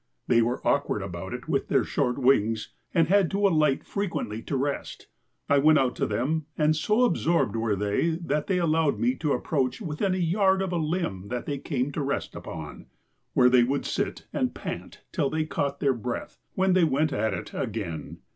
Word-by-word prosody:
They 120 -1 +4
were 120 +2 -1
awkward 140 -7 +1
about 95 0 -6
it 125 +2 -6
with 140 -4 0
their - - +3
short 125 -5 0
wings 115 -5 +2 0.2
and 165 -3 +3
had 195 -1 +4
to 200 +1 +2
alight 155 -6 +2
frequently 170 - -3
to 140 - -2
rest. 140 +2 -3 0.4
I 140 - +4
went 155 +2 +6
out 130 -3 +1
to - - 0
them 150 +4 -1
and 155 0 +3
so 210 +10 +2
absorbed 170 - +2
were 115 -2 0
they 105 - 0
that 150 +1 -1
they 190 - +1
allowed 160 -3 +2
me 250 +1 +2
to 150 -3 0
approach 130 -5 -1
within 185 +5 -1
a - - -2
yard 190 +2 +2
of 185 -2 -3
a - - +1
limb 155 - -2
that 120 +1 -4
they 145 -2 -3
came 135 -2 -2
to 145 - -3
rest 140 0 -2
upon, - - -8 0.5
where 125 - +5
they 125 -1 +6
would 135 +3 -1
sit - - -2
and - - -1
pant - - -7
till 140 - 0
they 155 +1 -1
caught 140 -2 -2
their 140 -2 +2
breath, 120 0 -5 0.2
when 190 0 +3
they 185 -1 +4
went 155 0 +2
at 110 +1 0
it - - -7
again. 85 - -4
145 Hz, 200 wpm, -26 LUFS, 125-165 Hz, 0.5 s, went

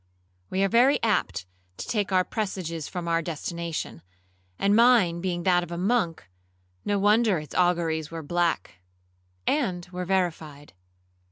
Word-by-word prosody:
We 190 +1 0
are - - +4
very 245 +7 +4
apt 210 - 0 0.3
to - - -6
take 205 -3 -1
our 185 -1 +4
presages 180 -7 -4
from 175 -2 -5
our 165 0 +2
destination, 170 - -5 0.6
and 200 +1 +2
mine 225 -8 +5
being 175 -2 -2
that 180 -1 +4
of 175 -1 -7
a 170 - -4
monk, 180 - 0 0.6
no 205 - 0
wonder 210 0 +3
its 150 -1 -8
auguries 170 -4 +1
were 165 -1 -6
black,—and 90 - -3
were 180 0 -4
verified. 160 -6 -2
175 Hz, 140 wpm, -26 LUFS, 160-195 Hz, 0.6 s, mine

